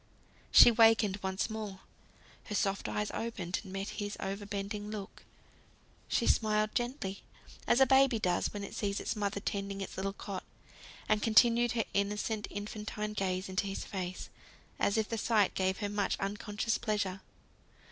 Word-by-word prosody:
She 240 Hz, -, +9 dB
wakened 225 Hz, -3 st, +5 dB
once 190 Hz, 0 st, -1 dB
more; 215 Hz, -4 st, -6 dB, 0.6 s
her 210 Hz, -, -4 dB
soft 195 Hz, -1 st, 0 dB
eyes 210 Hz, 0 st, -2 dB
opened, 195 Hz, -6 st, -3 dB
and 190 Hz, -, -10 dB
met 195 Hz, +1 st, -3 dB
his 205 Hz, -1 st, -4 dB
over 195 Hz, +1 st, -4 dB
bending 205 Hz, +1 st, -4 dB
look. 210 Hz, -2 st, -7 dB, 0.9 s
She -, -, +1 dB
smiled 215 Hz, -1 st, +2 dB
gently, 240 Hz, -6 st, -2 dB, 0.5 s
as 240 Hz, -, +4 dB
a 265 Hz, -, +8 dB
baby 265 Hz, -2 st, +5 dB
does 180 Hz, -5 st, 0 dB
when 205 Hz, -1 st, -5 dB
it 200 Hz, -, -7 dB
sees 200 Hz, -1 st, -1 dB
its -, -, -2 dB
mother 200 Hz, -1 st, -1 dB
tending 200 Hz, -1 st, -3 dB
its 195 Hz, -, -6 dB
little 195 Hz, +1 st, -2 dB
cot; 195 Hz, -2 st, -6 dB, 0.6 s
and 210 Hz, 0 st, +2 dB
continued 235 Hz, +1 st, +5 dB
her 225 Hz, -2 st, 0 dB
innocent, 210 Hz, +2 st, -1 dB
infantine 210 Hz, +1 st, -5 dB
gaze 185 Hz, -2 st, -1 dB
into 190 Hz, +2 st, -1 dB
his 195 Hz, -, -4 dB
face, 185 Hz, -2 st, -5 dB, 0.5 s
as 200 Hz, -, +2 dB
if 220 Hz, -1 st, +1 dB
the 230 Hz, -, -3 dB
sight 210 Hz, -3 st, +3 dB
gave 190 Hz, 0 st, 0 dB
her 205 Hz, -, 0 dB
much 205 Hz, -1 st, -1 dB
unconscious 205 Hz, +3 st, -2 dB
pleasure. 200 Hz, -3 st, -1 dB
205 Hz, 160 wpm, -32 LUFS, 195-220 Hz, 0.9 s, She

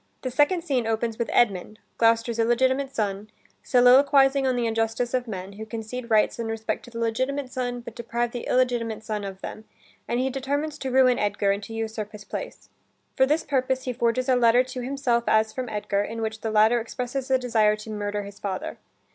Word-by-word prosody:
The 255 Hz, -, -2 dB
second 295 Hz, +7 st, +2 dB
scene 260 Hz, -8 st, 0 dB
opens 225 Hz, 0 st, -1 dB
with 235 Hz, -, -1 dB
Edmund, 215 Hz, -2 st, +1 dB, 0.2 s
Gloucester's 230 Hz, 0 st, +2 dB
illegitimate 260 Hz, +4 st, +1 dB
son, 205 Hz, -1 st, -2 dB, 0.3 s
soliloquizing 270 Hz, +2 st, +5 dB
on 255 Hz, -, +1 dB
the 240 Hz, -1 st, 0 dB
injustice 225 Hz, +2 st, -1 dB
of 250 Hz, -1 st, 0 dB
men, 190 Hz, -2 st, -6 dB
who 215 Hz, +2 st, -8 dB
concede 230 Hz, +2 st, -6 dB
rights 220 Hz, +1 st, +3 dB
and 230 Hz, -1 st, -3 dB
respect 225 Hz, 0 st, -3 dB
to -, -, -12 dB
the 235 Hz, -, -9 dB
legitimate 255 Hz, +4 st, -1 dB
son, 245 Hz, -1 st, -3 dB
but 235 Hz, -1 st, -9 dB
deprive 235 Hz, +1 st, -2 dB
the 245 Hz, -, -6 dB
illegitimate 240 Hz, -4 st, 0 dB
son 215 Hz, -1 st, -3 dB
of 195 Hz, -1 st, -7 dB
them, 215 Hz, -, -7 dB, 0.4 s
and 240 Hz, -, 0 dB
he 265 Hz, +1 st, 0 dB
determines 285 Hz, +3 st, -2 dB
to 265 Hz, -, -3 dB
ruin 255 Hz, -1 st, +4 dB
Edgar, 200 Hz, -1 st, +1 dB
and 200 Hz, +1 st, -1 dB
to 225 Hz, -, -9 dB
usurp 220 Hz, -1 st, -4 dB
his 210 Hz, -1 st, -9 dB
place. -, -, -7 dB, 0.5 s
For 265 Hz, -, +4 dB
this 305 Hz, +3 st, +1 dB
purpose, 260 Hz, -1 st, 0 dB
he 250 Hz, -, -3 dB
forges 240 Hz, +2 st, 0 dB
a 260 Hz, -, +4 dB
letter 245 Hz, 0 st, +5 dB
to 255 Hz, 0 st, -6 dB
himself 250 Hz, -2 st, 0 dB
as 220 Hz, 0 st, +3 dB
from 255 Hz, -1 st, -4 dB
Edgar, 205 Hz, -1 st, -1 dB
in 225 Hz, +2 st, -5 dB
which 220 Hz, 0 st, -4 dB
the 225 Hz, -, -2 dB
latter 220 Hz, +2 st, +4 dB
expresses 250 Hz, +3 st, -4 dB
a 260 Hz, -, +4 dB
desire 225 Hz, -4 st, +2 dB
to 215 Hz, +1 st, -9 dB
murder 205 Hz, -1 st, -3 dB
his 200 Hz, 0 st, -11 dB
father. 190 Hz, -2 st, -4 dB
235 Hz, 205 wpm, -25 LUFS, 220-255 Hz, 0.5 s, soliloquizing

